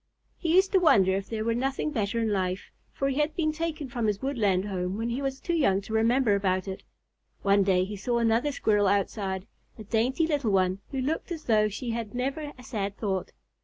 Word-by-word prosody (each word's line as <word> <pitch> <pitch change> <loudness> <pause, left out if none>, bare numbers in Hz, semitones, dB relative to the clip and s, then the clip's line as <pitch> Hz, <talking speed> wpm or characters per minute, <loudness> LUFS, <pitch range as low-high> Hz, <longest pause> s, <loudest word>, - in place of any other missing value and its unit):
He 335 -1 +1
used 380 +1 +4
to 385 - +5
wonder 195 - +5
if 195 0 -4
there 220 -1 -2
were 230 - +2
nothing 270 +5 -1
better 220 -4 -1
in 225 -1 +1
life, 185 -1 -2 0.2
for 275 - -1
he 275 +2 -1
had 300 +1 0
been 310 -3 +1
taken 310 -2 -3
from 235 -3 -2
his 205 -2 0
woodland 205 -8 +1
home 185 -1 -2
when 230 +2 -2
he 245 +4 -2
was 270 -1 -2
too 345 - -2
young 235 - +3
to 210 +2 -8
remember 230 +1 +3
about 190 -1 0
it. 190 0 -5 0.6
One 200 0 +4
day 190 -2 +3
he 205 +3 -5
saw 235 +4 -1
another 235 +5 +2
Squirrel 210 -6 +2
outside, 195 -1 0 0.3
a 220 - -8
dainty 235 - +1
little 290 -7 0
one 185 -1 +2
who 270 - -3
looked 310 +7 -2
as 325 -2 -4
though 215 -2 +3
she 235 +4 -4
had 230 -1 -4
never 275 +4 -2
a 250 - -13
sad 205 -3 -4
thought. 190 -4 -2
225 Hz, 220 wpm, -27 LUFS, 200-270 Hz, 0.6 s, to